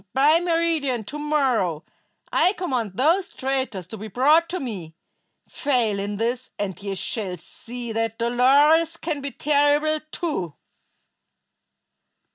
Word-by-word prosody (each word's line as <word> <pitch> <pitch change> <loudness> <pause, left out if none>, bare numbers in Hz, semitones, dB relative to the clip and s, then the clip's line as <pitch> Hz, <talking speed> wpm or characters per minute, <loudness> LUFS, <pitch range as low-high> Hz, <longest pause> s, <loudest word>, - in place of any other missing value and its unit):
By 295 +5 +5
meridian 330 -8 0
to 290 +9 -7
morrow 255 - +1 0.5
I 365 - +4
command 255 - -2
those 350 - +2
traitors 260 -8 -2
to 220 +5 -8
be 215 - -6
brought 300 - +3
to 365 - -3
me. 185 -11 -6 0.5
Fail 240 -8 0
in 205 +1 -3
this, 240 +4 -2
and 200 -2 -4
ye 200 -1 -3
shall 190 -1 -3
see 235 +7 -8
that 225 0 -2
Dolores 285 +8 +4
can 310 -4 -3
be 280 - -2
terrible, 295 +2 +2
too." 290 - -3
260 Hz, 125 wpm, -23 LUFS, 220-305 Hz, 0.5 s, By